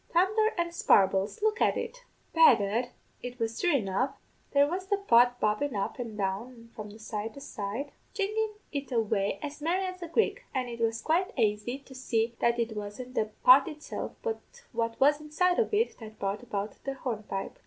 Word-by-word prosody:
Thundher 430 +5 +3
and 340 0 -1
sparbles, 195 - +3
look 435 +1 +1
at - - +3
it!' - - -6 0.3
"Begad, 240 -7 +5 0.3
it 245 0 -6
was 225 -1 -2
thrue 350 -4 +3
enough; 235 +3 0 0.3
there 280 0 +5
was 370 +4 -3
the 405 0 +2
pot 245 -10 +4
bobbin' 215 +5 0
up 200 +5 -2
an' 230 -3 -5
down 195 +3 -1
and 230 -2 -15
from 210 -1 -8
side 220 0 -5
to - - -8
side, 260 +1 -5 0.2
jiggin' 425 +1 -1 0.2
it 280 -1 -4
away 205 -4 +1
as 295 0 -6
merry 360 +5 +1
as 370 0 -6
a 345 - -4
grig; 385 +7 +1
an' 255 -2 -1
it 235 0 -7
was 225 -1 0
quite 350 +4 +1
aisy 215 +2 +1
to 275 -1 -15
see 235 -3 0
that 235 0 +2
it 230 -2 -1
wasn't 210 +5 -6
the 220 - +1 0.2
pot 265 +2 +8
itself, 300 -2 -6
but 455 -2 -2 0.3
what 230 -1 -2
was 290 +2 +4
inside 355 +4 +1
of 465 - +1
it, 440 +3 +1
that 220 -1 -10
brought 200 +1 -2
about 210 -4 -5
the 275 0 -3
hornpipe. 215 -7 -4
250 Hz, 190 wpm, -29 LUFS, 220-335 Hz, 0.3 s, pot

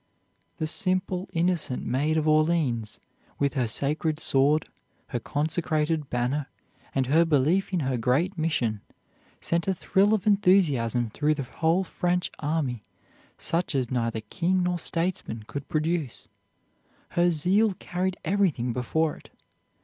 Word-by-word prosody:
The 155 - -1
simple, 185 +2 0
innocent 170 -6 0
Maid 150 +5 +1
of 155 0 0
Orleans 155 -8 +1 0.4
with 140 -1 +1
her 130 -4 0
sacred 150 +6 -1
sword, 145 +2 +2 0.4
her 120 - -2
consecrated 155 +1 -1
banner, 125 +4 -1 0.5
and 135 -1 +2
her 155 +6 +4
belief 160 +5 +2
in 180 -3 0
her 130 -2 0
great 145 - +1
mission, 130 - -1 0.6
sent 170 +1 -1
a 190 - +1
thrill 205 +4 +3
of 200 - -4
enthusiasm 150 - +3
through 150 +5 +1
the 140 - -3
whole 165 +8 +1
French 180 0 -1
army 145 -7 -1 0.5
such 170 -2 -1
as 130 -2 0
neither 115 -3 -1
king 180 - 0
nor 180 0 0
statesmen 165 -11 -2
could 140 +4 -7
produce. 155 -4 -2 0.8
Her 175 +1 +2
zeal 185 +6 +2
carried 180 +1 -3
everything 165 -10 +1
before 150 +6 0
it. - - -17
155 Hz, 135 wpm, -26 LUFS, 135-180 Hz, 0.8 s, her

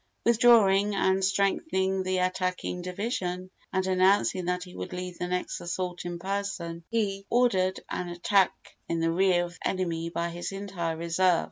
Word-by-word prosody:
Withdrawing 210 -4 +5
and 190 0 +2
strengthening 190 - +1
the 185 0 -1
attacking 185 0 -1
division, 185 -1 -3 0.2
and 190 0 0
announcing 185 0 +3
that 180 0 -1
he 180 -1 -12
would - - -6
lead 180 -1 -6
the 180 - -2
next 180 0 -2
assault 180 0 -4
in 175 0 -4
person, 185 -3 -4
he 200 -4 -1
ordered 190 -7 +2
an 180 - -4
attack 180 +2 +3 0.4
in 170 - 0
the 165 0 +1
rear 180 0 +3
of 175 - -9
the - - -2
enemy 170 -3 -2
by 170 0 -2
his 175 +2 -5
entire 185 -5 -3
reserve. 170 +1 +2
185 Hz, 160 wpm, -28 LUFS, 175-195 Hz, 0.4 s, Withdrawing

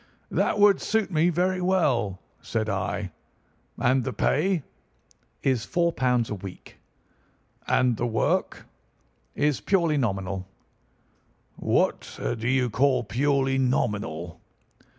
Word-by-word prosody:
"'That - - +1
would 205 -1 +5
suit 220 -2 0
me 165 +1 +3
very 180 +2 0
well,' 135 - +1 0.2
said 110 -1 -2
I. 95 -1 -2 0.7
'And 130 +1 +2
the - - -2
pay?' 170 +1 +1 0.8
"'Is 130 -4 +1
£ - - -19
4 170 -1 +1 0.4
a 105 - -4
week.' 95 -2 -10 0.9
"'And 125 -3 +2
the 120 - -1
work?' 110 -1 0 0.7
"'Is 145 -7 +1
purely 170 -6 +2
nominal.' 95 -6 -2 1.1
"'What - - 0
do 115 0 -2
you 130 -2 +1
call 130 +1 +2
purely 135 +3 +1
nominal? 105 -10 -1
130 Hz, 110 wpm, -26 LUFS, 105-160 Hz, 1.1 s, would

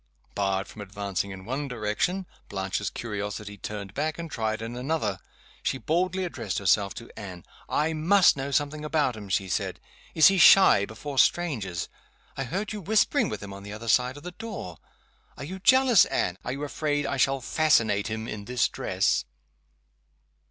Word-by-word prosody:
Barred 95 -1 -1
from 105 - -10
advancing 100 -1 -3
in 95 -1 -9
one 135 +5 -3
direction, 125 - -1 0.2
Blanche's 95 +1 -2
curiosity 105 -2 -5
turned 100 -1 -7
back, 155 +4 -2
and 165 -2 -6
tried 110 -1 -1
in 115 +2 -6
another. 125 - -1 0.4
She - - -1
boldly 185 +6 0
addressed 115 - -4
herself 100 +1 +2
to 115 - -10
Anne. 90 -4 -9 0.2
"I 155 +2 +1
must 175 +5 +5
know 135 0 -4
something 145 +2 -1
about 150 -5 +1
him," 105 -2 -9
she 95 +1 0
said. 90 - -2 0.4
"Is 160 - +6
he 195 +1 +6
shy 170 - +7
before 135 +5 -4
strangers? 110 - +1 0.5
I 135 - -3
heard 200 - -3
you 210 - -5
whispering 210 +4 +2
with 105 -1 -5
him 100 -1 -7
on 100 - -9
the 100 +1 -8
other 110 +2 -8
side 125 +3 +2
of 145 - -12
the 180 - -6
door. 180 - -7 0.6
Are - - -7
you 185 +6 -6
jealous, 260 0 +6
Anne? 90 +1 -1
Are - - -3
you 140 +2 -5
afraid 145 0 -1
I 140 - -2
shall 135 +1 +2
fascinate 115 -7 +2
him 110 0 -4
in 105 -2 -6
this 125 -1 +1
dress?" - - 0
125 Hz, 175 wpm, -27 LUFS, 100-155 Hz, 0.6 s, shy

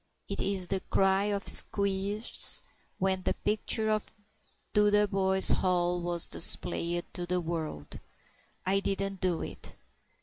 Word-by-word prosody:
It - - -5
is 190 -2 0
the 195 - -1
cry 195 +1 +2
of 205 -1 -3
Squeers 200 +2 +3 0.3
when 190 0 -1
the - - -2
picture 215 +1 -1
of 215 -1 -2 0.6
Dotheboys 205 -2 +2
Hall 175 -1 0
was 175 -1 +1
displayed 175 0 +1
to 175 0 -4
the 180 +1 -1
world: 160 - -6 0.7
"I 195 +1 +1
didn't 195 -1 -4
do 180 -3 -1
it." - - -8
190 Hz, 125 wpm, -29 LUFS, 175-200 Hz, 0.7 s, Squeers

